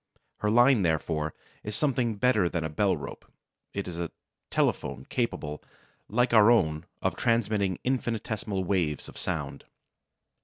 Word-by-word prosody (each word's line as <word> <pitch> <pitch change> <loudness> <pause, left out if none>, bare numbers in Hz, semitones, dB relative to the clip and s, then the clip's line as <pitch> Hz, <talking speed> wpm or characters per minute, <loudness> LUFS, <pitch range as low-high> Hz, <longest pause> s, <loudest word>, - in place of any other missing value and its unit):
Her 105 - 0
line, 120 +1 +5
therefore, 80 -2 0 0.3
is 105 0 -4
something 125 -5 +1
better 105 -5 +3
than 85 -2 -2
a 80 - -2
bell 75 - +1
rope; - - -9 0.4
it 100 -1 -4
is 85 -1 -5
a 85 -1 -2 0.4
telephone 65 - 0
capable, 75 - -2 0.5
like 120 +3 +2
our 110 -1 +7
own, 80 -8 +2 0.2
of - - +1
transmitting 105 -5 +1
infinitesimal 110 -6 -1
waves 85 -6 0
of - - -12
sound. - - -3
100 Hz, 140 wpm, -28 LUFS, 85-120 Hz, 0.5 s, our